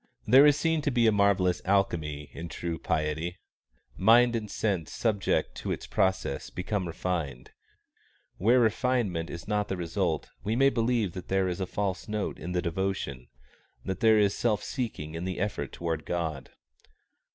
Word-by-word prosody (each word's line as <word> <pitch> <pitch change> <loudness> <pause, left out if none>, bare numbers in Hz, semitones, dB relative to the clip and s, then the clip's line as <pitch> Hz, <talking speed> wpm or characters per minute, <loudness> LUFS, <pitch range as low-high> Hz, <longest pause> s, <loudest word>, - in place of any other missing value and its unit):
There 135 +6 +8
is 145 -1 +5
seen 160 +1 +1
to 145 - 0
be 120 -3 +2
a 110 - +6
marvellous 100 -3 +2
alchemy 80 -7 0
in 85 +1 -7
true 85 -1 -4
piety. 80 +2 -1 0.6
Mind 120 +4 +5
and 110 -2 -3
sense 95 -8 -1
subject 110 -4 0
to - - -4
its - - -4
process 95 -7 0
become 95 +1 -3
refined. 80 -7 -3 0.9
Where 115 +7 +4
refinement 110 -7 +1
is 85 +2 -8
not 105 -1 0
the 95 - -3
result, 85 -2 -2
we 110 +3 0
may 135 +2 +4
believe 115 -4 +1
that 90 - -7
there 95 -1 +1
is 90 0 -3
a 95 - -2
false 100 0 -2
note 105 -1 -3
in 90 - -5
the 90 -1 0
devotion, 85 -7 -3 0.6
that 95 -1 -3
there 110 -1 +5
is 100 -1 +3
self 110 -4 0
seeking 110 - -4
in 80 +1 -4
the 95 0 -3
effort 105 +2 -2
toward 80 -2 -3
God. 80 -6 -3
95 Hz, 165 wpm, -28 LUFS, 85-110 Hz, 0.9 s, There